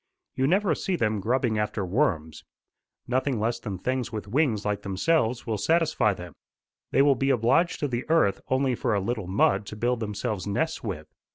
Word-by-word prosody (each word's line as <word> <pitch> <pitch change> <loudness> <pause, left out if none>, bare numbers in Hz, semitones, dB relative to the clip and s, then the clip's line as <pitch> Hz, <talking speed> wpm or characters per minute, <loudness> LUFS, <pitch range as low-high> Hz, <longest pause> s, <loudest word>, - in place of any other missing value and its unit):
You 135 0 +1
never 195 +5 +2
see 190 - -2
them 110 -8 0
grubbing 115 +1 0
after 105 -1 -1
worms. 90 - -1 0.6
Nothing 130 0 0
less 115 +2 -1
than 105 -5 -5
things 125 +4 -2
with 105 -2 -5
wings 120 -3 +1
like 105 -1 -1
themselves 115 - 0
will 110 -3 -2
satisfy 160 - +2
them. 90 -3 -9 0.6
They 135 - +4
will 140 -1 +5
be 135 +1 -1
obliged 135 +8 +2
to 145 - +1
the 125 +1 -4
earth 160 -12 +3
only 130 0 +1
for 115 -2 0
a - - +2
little 110 -1 -3
mud 100 +1 +2
to - - -7
build 120 +2 0
themselves 105 -2 -3
nests 160 +11 -1
with. 90 -9 -4
115 Hz, 185 wpm, -26 LUFS, 105-135 Hz, 0.6 s, will